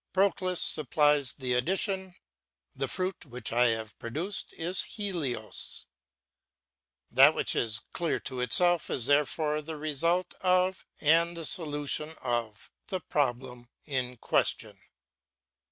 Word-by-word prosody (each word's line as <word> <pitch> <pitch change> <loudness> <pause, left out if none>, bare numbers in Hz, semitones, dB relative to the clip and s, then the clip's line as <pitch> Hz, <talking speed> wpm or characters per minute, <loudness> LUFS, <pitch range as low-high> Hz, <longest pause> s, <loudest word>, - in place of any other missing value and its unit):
Proclus 185 -2 +1
supplies 150 -1 +2
the 130 -3 -2
addition, 190 - -1 0.3
* 60 0 -48
The - - -2
fruit 185 +1 -2
which 120 -3 -5
I 120 +1 +5
have 110 -2 -2
produced 165 - -3
is 175 +3 +2
Helios,^ 165 - -3 1.3
That - - +7
which - - 0
is 110 -2 0
clear 170 -2 0
to 130 -2 -4
itself 175 +8 +2
is 120 - -2
therefore 150 +2 +1
the 155 +1 -7
result 165 +4 0
of, 185 0 +2
and 165 +3 +3
the 165 - -4
solution 150 0 0
of, 120 -4 -3 0.2
the 185 -3 -3
problem 125 -4 -2 0.2
in 125 -4 -2
question. - - 0
150 Hz, 120 wpm, -29 LUFS, 125-175 Hz, 1.3 s, That